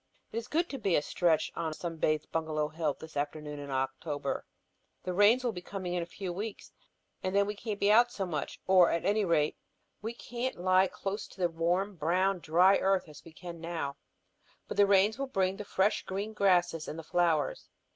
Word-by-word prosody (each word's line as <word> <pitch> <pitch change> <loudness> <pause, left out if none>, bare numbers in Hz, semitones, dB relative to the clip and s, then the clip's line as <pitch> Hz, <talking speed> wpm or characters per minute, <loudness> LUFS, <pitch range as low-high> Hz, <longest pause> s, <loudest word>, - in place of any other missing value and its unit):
It - - -5
is 230 +1 -3
good 335 +6 +1
to 275 - -5
be 195 -6 +2
a - - +3
stretch 160 -2 +1
on 160 -1 -2
sunbathed 155 -2 -1
Bungalow 155 -2 -1
Hill 155 -2 -1
this 160 -1 -11
afternoon 150 0 -3
in 140 0 -7
October. 135 +2 -2 0.6
The 180 - -3
rains 210 +7 +5
will 245 - +1
be 180 -4 -7
coming 185 -1 -5
in 175 - 0
a 170 - -5
few 185 0 -5
weeks 205 +3 -6 0.5
and 185 +1 -2
then 200 0 +4
we 205 - -3
can't 210 0 -5
be 200 - +4
out 240 +3 +6
so 195 - -3
much. 155 -5 -4
Or 185 -2 +6
at 170 +1 -1
any 205 +2 +2
rate 160 -5 +1 0.4
we 225 +3 -4
can't 245 +2 -4
lie 185 +1 +4
close 195 +3 -4
to - - -17
the 175 -1 +2
warm, 175 +4 0
brown, 180 +5 +1
dry 180 +4 +5
earth 190 -2 +1
as 150 - -13
we 165 - -13
can 170 0 -9
now. 165 -5 -4 0.7
But - - -6
the 205 -1 +6
rains 200 +4 +4
will 275 - -1
bring 190 -5 0
the 210 - -6
fresh, 195 +1 +1
green 200 +3 -4
grasses 175 -5 +2
and 155 - -5
the 165 - -6
flowers. 165 -3 0
180 Hz, 205 wpm, -31 LUFS, 160-200 Hz, 0.7 s, out